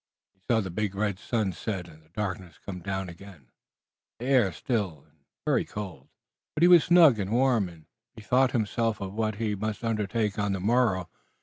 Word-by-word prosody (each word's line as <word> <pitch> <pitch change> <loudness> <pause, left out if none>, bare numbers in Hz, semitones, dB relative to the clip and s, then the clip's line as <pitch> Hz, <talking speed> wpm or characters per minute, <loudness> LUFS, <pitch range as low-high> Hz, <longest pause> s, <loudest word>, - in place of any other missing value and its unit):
He 95 - -40
saw 115 -2 +4
the 95 -3 -5
big 100 +1 -2
red 100 -2 -1
sun 105 -4 -1
set 95 -1 -4
and 80 -2 -16
the 80 - -27
darkness 95 -1 -5
come 95 -2 -7
down 95 +1 -3
again, 85 -6 -13 0.7
the 120 - -7
air 125 -8 +4
still 95 - -3
and 75 0 -33 0.3
very - - +2
cold. 100 -5 -7 0.5
But 155 - +1
he - - +8
was 175 -3 +7
snug 165 -9 +6
and 95 -1 -2
warm, 120 -5 +2
and 80 -2 -16 0.3
bethought 125 +4 +2
himself 115 -1 0
of 95 -1 -5
what 110 0 -1
he 110 0 -1
must 110 +3 -3
undertake 105 -2 -1
on 100 -1 0
the 95 - -2
morrow. 105 -3 +2
105 Hz, 190 wpm, -27 LUFS, 95-115 Hz, 0.7 s, he